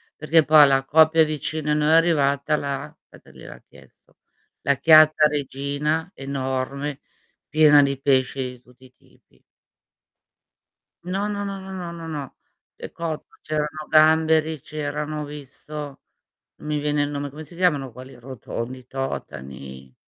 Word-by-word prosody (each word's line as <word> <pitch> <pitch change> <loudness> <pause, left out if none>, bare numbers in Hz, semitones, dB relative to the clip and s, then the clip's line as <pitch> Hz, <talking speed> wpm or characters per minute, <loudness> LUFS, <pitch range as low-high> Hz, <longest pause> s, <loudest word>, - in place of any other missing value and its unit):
perché 160 +1 +3
poi 150 +1 +7
alla 135 -1 +3
coppia 160 +3 +5
vicini 155 0 -3
a - - +3
noi 150 0 +1
è - - +4
arrivata 150 -3 +2
la 140 +2 -5
aspetta, - - -18
gliel'ha - - -13
chiesto, - - -21 0.4
la 140 - +2
chiatta 155 0 +6
regina, 150 +3 -2
enorme, 135 +1 -4 0.5
piena 150 -1 +6
di 140 -1 -1
pesce 135 -1 +1
di 125 -1 -6
tutti 125 +1 -21
i 130 - -20
tipi. 60 - -28 1.6
No, 195 +3 -2
no, 205 -1 -3
no, 195 -1 -5
no, 190 0 -9
no, 180 -3 -6
no, 165 -1 -8
no, 145 -4 -6 0.4
è - - -9
cotto, 165 -2 -6
c'erano 155 0 -4
gamberi, 160 0 +3
c'erano 150 +1 -4
ho - - -5
visto, 145 0 -9 0.6
n - - -14
mi 150 0 -1
viene 145 0 0
il 145 - -2
nome, 145 0 -4
come 150 +3 -10
si 170 +3 -15
chiamano 145 -8 +1
quelli 130 +3 -12
rotondi, 125 0 -7
i 125 - -20
totani. 65 - -7
150 Hz, 150 wpm, -23 LUFS, 135-155 Hz, 1.6 s, poi